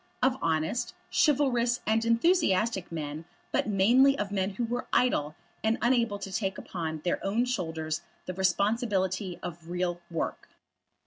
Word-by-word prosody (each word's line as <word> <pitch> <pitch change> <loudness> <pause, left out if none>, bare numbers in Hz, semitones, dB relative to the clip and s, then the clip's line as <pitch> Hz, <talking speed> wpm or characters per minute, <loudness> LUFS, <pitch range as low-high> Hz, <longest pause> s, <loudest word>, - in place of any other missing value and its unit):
Of 255 0 +4
honest, 160 +9 0 0.2
chivalrous, 250 -5 +3
and 220 +1 +2
enthusiastic 230 - +2
men, 155 0 -5 0.3
but - - +1
mainly 240 +8 +5
of 205 -4 -2
men 190 -1 0
who 240 - -1
were 245 +2 -3
idle, 155 -12 +2 0.3
and 220 +1 +2
unable 235 -3 +2
to 195 -1 -7
take 195 -2 -1
upon 160 -3 -4
their 175 - -1
own 215 +5 +1
shoulders 160 -8 -2 0.2
the 185 - -4
responsibility 190 -1 0
of 170 -1 -7
real 175 0 -2
work. 165 -2 -4
195 Hz, 140 wpm, -29 LUFS, 175-235 Hz, 0.3 s, mainly